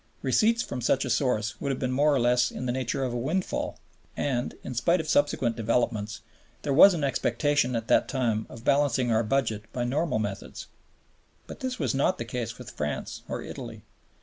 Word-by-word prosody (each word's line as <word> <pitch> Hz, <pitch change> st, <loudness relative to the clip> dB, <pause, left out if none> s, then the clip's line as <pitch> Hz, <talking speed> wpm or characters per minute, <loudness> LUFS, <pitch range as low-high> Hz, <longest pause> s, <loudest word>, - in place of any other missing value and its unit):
Receipts 230 Hz, +2 st, +3 dB
from 125 Hz, -, -5 dB
such 130 Hz, +3 st, +2 dB
a -, -, -2 dB
source 110 Hz, -6 st, 0 dB
would 140 Hz, -, -1 dB
have 135 Hz, -, -1 dB
been 130 Hz, -1 st, -2 dB
more 145 Hz, +4 st, +3 dB
or -, -, +2 dB
less 125 Hz, +1 st, +3 dB
in 125 Hz, -, -6 dB
the 125 Hz, -, 0 dB
nature 130 Hz, +1 st, -2 dB
of 125 Hz, -2 st, -2 dB
a -, -, -1 dB
windfall; 160 Hz, +10 st, -2 dB, 0.4 s
and, 125 Hz, -3 st, -1 dB
in 130 Hz, -, -5 dB
spite 170 Hz, +9 st, +2 dB
of 160 Hz, -, -4 dB
subsequent 145 Hz, -6 st, +2 dB
developments, 110 Hz, -2 st, -1 dB, 0.4 s
there 140 Hz, -, 0 dB
was 185 Hz, +6 st, +8 dB
an 155 Hz, -, -2 dB
expectation 140 Hz, -1 st, +1 dB
at 115 Hz, -1 st, -3 dB
that -, -, +4 dB
time 115 Hz, -5 st, -1 dB
of 115 Hz, -1 st, -11 dB
balancing 140 Hz, -3 st, +2 dB
our 110 Hz, 0 st, +3 dB
budget 110 Hz, -2 st, -1 dB
by 120 Hz, -, -2 dB
normal 145 Hz, +4 st, 0 dB
methods. 105 Hz, -3 st, -5 dB, 0.8 s
But -, -, -10 dB
this 255 Hz, -1 st, -3 dB
was -, -, 0 dB
not 140 Hz, +7 st, +1 dB
the -, -, -4 dB
case 120 Hz, -3 st, -4 dB
with 125 Hz, -, -9 dB
France 75 Hz, -1 st, -4 dB
or -, -, -3 dB
Italy. -, -, -8 dB
125 Hz, 200 wpm, -27 LUFS, 115-145 Hz, 0.8 s, was